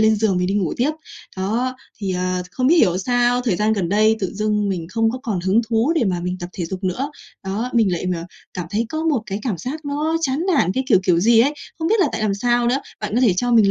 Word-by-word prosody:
lên 220 0 +4
giường 205 -3 +1
mình 180 - 0
đi 195 - -1
ngủ 190 -6 0
tiếp. 260 +5 +2 0.5
Đó, 230 +7 -1 0.2
thì, 195 -3 -2
ờ, 185 0 -1
không 255 +6 -1
biết 330 +6 +5
hiểu 185 - +4
sao 245 +3 +2
thời 230 -8 0
gian 215 +2 +2
gần 195 -6 -1
đây 215 +3 +3
tự 190 - -2
dưng 210 0 0
mình 180 -4 -3
không 225 +1 +1
còn 210 -8 -2
hứng 190 +5 +3
thú 235 +6 +2
để 265 - +3
mà 180 -4 0
mình 180 +1 -3
tập 175 - -5
thể 180 - -4
dục 190 +2 -6
nữa. 255 +10 -1 0.3
Đó, 210 +6 -2
mình 220 -5 +3
lại, 175 - -2
à, 170 0 -6 0.3
cảm 180 -3 -4
thấy 220 +3 0
có 315 +5 -3
một 300 -8 +1
cái 200 -1 -3
cảm 215 -9 -2
giác 290 - -5
nó 300 +3 -1
chán 275 -3 0 0.2
nản, 185 - +2
cái 260 +6 -1
kiểu, 215 - +6
kiểu 180 -3 +3
gì 225 +4 +5
ấy, 280 +5 +2 0.2
không 325 0 -1
biết 440 +1 +3
là 330 - +4
tại 220 - -3
làm 205 -2 +1
sao 240 +3 +1
nữa. 255 +3 +2 0.2
Bạn 210 -1 -3
có 240 - +3
thể 240 -7 +4
cho 245 +6 0
mình 220 -4 +5
215 Hz, 270 wpm, -21 LUFS, 190-245 Hz, 0.5 s, kiểu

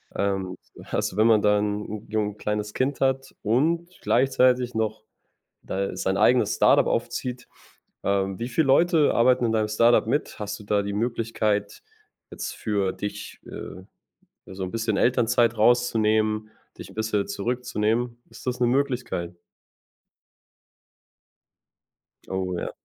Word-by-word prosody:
Ähm, 95 -2 -1 0.4
also 95 - -1
wenn 110 +2 +5
man 110 -2 +5
da 105 0 +4
'n 105 0 -3
jung 105 -1 -1
kleines 105 0 -3
Kind 135 +2 -1
hat 135 0 0
und 160 +10 +1
gleichzeitig 125 -1 +2
noch 110 -1 -2 0.6
da 100 +1 -3
sein 95 +1 0
eigenes 125 0 +3
Start-up - - +4
aufzieht. 125 0 -3 0.6
Ähm, 95 -1 0
wie 120 +2 -3
viel 155 +6 +2
Leute 160 +3 +4
arbeiten 125 +1 +4
in 115 - +1
deinem 110 -1 +1
Start-up 115 +1 +4
mit? 145 +5 -1
Hast 105 0 -5
du - - -11
da 100 0 +1
die 100 0 -4
Möglichkeit, 110 - -1 0.5
jetzt - - -5
für 100 -3 -1
dich, 100 +2 -6
äh, 95 - -8 0.6
so 95 0 -6
'n 90 - -4
bisschen 115 -2 -1
Elternzeit 120 -2 +2
rauszunehmen, 110 -2 +2 0.3
dich - - -9
'n - - -17
bisschen 110 -2 -1
zurückzunehmen? 120 +2 -2
Ist - - -13
das 125 0 -1
'ne 120 - +3
Möglichkeit? 120 -10 -1 2.9
Oh 95 -1 -2
ja. - - -3
110 Hz, 135 wpm, -25 LUFS, 105-125 Hz, 2.9 s, wenn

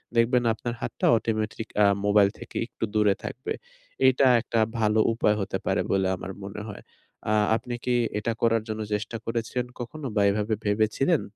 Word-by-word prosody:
দেখবেন 120 +1 +3
আপনার 120 +2 -4
হাতটা - - -3
automatic 110 0 -2 0.2
আ - - +7 0.2
মোবাইল 100 -1 +5
থেকে - - -12
একটু - - -8
দূরে 105 -2 +4
থাকবে। 130 - -4 0.5
এটা 130 +1 +4
একটা 115 - -1 0.2
ভালো 110 0 +2
উপায় 105 -2 +2
হতে 95 - -2
পারে - - +1
বলে 95 -1 +2
আমার 95 +1 -7
মনে 100 +2 -6
হয়। 100 - -8 0.5
আ - - +3 0.2
আপনি 120 +2 -4
কি 125 - +2 0.2
এটা 115 +2 -1
করার 115 -1 +3
জন্য 110 0 -3
চেষ্টা 105 +2 -2
করেছিলেন 115 +2 -2
কখনো 140 +5 -6
বা 105 - +3
এভাবে 105 +2 0
ভেবেছিলেন? 110 - +2
110 Hz, 170 wpm, -26 LUFS, 105-120 Hz, 0.5 s, আ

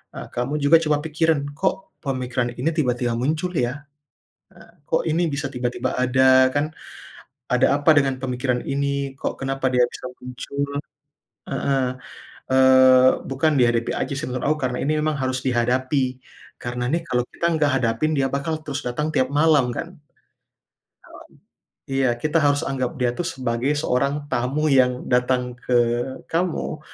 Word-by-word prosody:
eee, - - -7
kamu 125 +5 -1
juga 150 +4 +7
coba 150 -2 +2
pikirin, 155 -2 +1
"Kok 190 +3 -3
pemikiran 125 -3 -2
ini 130 +7 0
tiba-tiba 125 -5 0
muncul 155 +8 -1
ya?" 125 -3 0 0.9
nah, - - -21
"Kok - - +1
ini 165 +2 +1
bisa 140 +1 -2
tiba-tiba 125 -1 -2
ada?" 130 +1 +5
kan, 145 +2 0 0.8
"Ada 125 +3 +3
apa 160 - +6
dengan 135 -2 +1
pemikiran 125 -1 -1
ini? 140 0 -2
Kok - - -4
kenapa 135 0 -1
dia 125 - +5
bisa 130 - -9
muncul?" 140 +3 -4 0.7
Heeh, 135 -2 0 0.6
eee, 130 -1 +6 0.2
bukan 145 +4 +1
dihadapi 120 -1 +2
aja - - -2
sih 145 - -3
menurut 125 0 -3
aku, 155 - +2
karena 125 -1 -2
ini 155 +3 +1
memang 155 0 0
harus 130 -1 -1
dihadapi, 130 +2 0 0.4
karena 125 0 -3
nih 170 0 0
kalau 125 -4 +1
kita - - -4
nggak 150 -2 +2
hadapin 115 +7 0
dia 135 -1 +2
bakal 140 +3 -2
terus 145 -2 -4
datang 135 +6 -2
tiap 130 -2 +1
malam 145 -3 +3
kan. 170 +2 -6 1.9
Mmm, 135 0 -3
iya 125 -3 +2
kita 155 +6 0
harus 145 0 +2
anggap 130 -2 -2
dia 120 -1 +2
tuh 175 - -2
sebagai 130 -2 -1
seorang 140 +1 0
tamu 135 +6 0
yang 125 -2 +3
datang 125 0 +1
ke 125 0 -2 0.6
kamu 165 -2 -1
135 Hz, 150 wpm, -22 LUFS, 125-150 Hz, 1.9 s, juga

